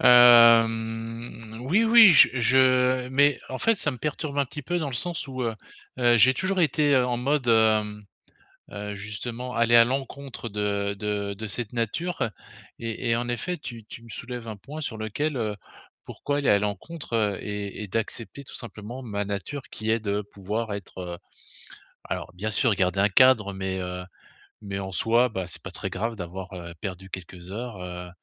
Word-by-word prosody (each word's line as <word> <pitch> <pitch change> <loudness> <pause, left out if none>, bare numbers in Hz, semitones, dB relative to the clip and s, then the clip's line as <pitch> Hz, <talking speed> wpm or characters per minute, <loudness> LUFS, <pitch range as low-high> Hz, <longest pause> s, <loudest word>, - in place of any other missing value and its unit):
Hem, 115 -1 +5
oui 215 +7 +4
oui 225 -3 +9
j - - +8
je 130 +1 +3
mais 140 +1 +4
en 130 - -5
fait, 225 0 +3
ça 155 -6 +1
me 125 - -8
perturbe 150 0 -3
un 140 - +3
petit 145 +3 -8
peu 175 +6 -1
dans 155 - -2
le 135 - -5
sens 165 +2 -2
où, 130 -1 -4
heu 115 -2 -1 0.4
heu, 120 -1 +4
j'ai 130 +3 +6
toujours 185 +4 0
été 145 -2 +3
en 125 -1 +2
mode, 135 +1 0
hem, 110 -2 +3 0.7
heu, 105 0 -5
justement 115 +5 -6
aller 115 0 +4
à 115 0 +8
l'encontre 135 -1 -4
de 100 -1 -1
de 105 -1 -2
de 110 +2 -6
cette 120 +2 -3
nature. 120 - -2 0.5
Et 115 +1 -4
et 115 - +3
en 120 +1 -2
effet 150 +10 -2
tu 115 -6 -9
tu 115 - -11
me 115 - -14
soulèves 120 +1 -7
un 110 - -6
point 145 +10 -8
sur 110 -7 -4
lequel, 130 +7 -2
heu 105 -3 -2 0.5
pourquoi 145 0 -3
aller 140 - +1
à 100 - +5
l'encontre 105 - -2
et 105 0 -5
et 105 - -5
d'accepter 115 +6 -4
tout - - -11
simplement 115 +2 -7
ma 105 -4 -3
nature 100 +8 -5
qui 110 0 -5
est 115 +1 +2
de 105 -1 -1
pouvoir 105 +2 -3
être, 100 -2 -8
heu 90 -1 -6 0.9
alors, - - -5
bien 105 +4 -3
sûr, 115 0 +4
garder 95 0 +1
un 100 - +4
cadre 115 -4 +5
mais, 95 0 -3
heu, 90 0 -5 0.6
mais 100 -2 -5
en 95 -1 -5
soi 115 +6 +3
bah, 95 -4 -4
c'est - - -5
pas - - -7
très - - -5
grave 115 +4 -2
d'avoir, 90 +1 -7
heu, 85 -2 -7
perdu 95 -2 -6
quelques 90 0 -9
heures, 115 0 -6
heu, 90 0 -7
115 Hz, 185 wpm, -25 LUFS, 100-130 Hz, 0.9 s, oui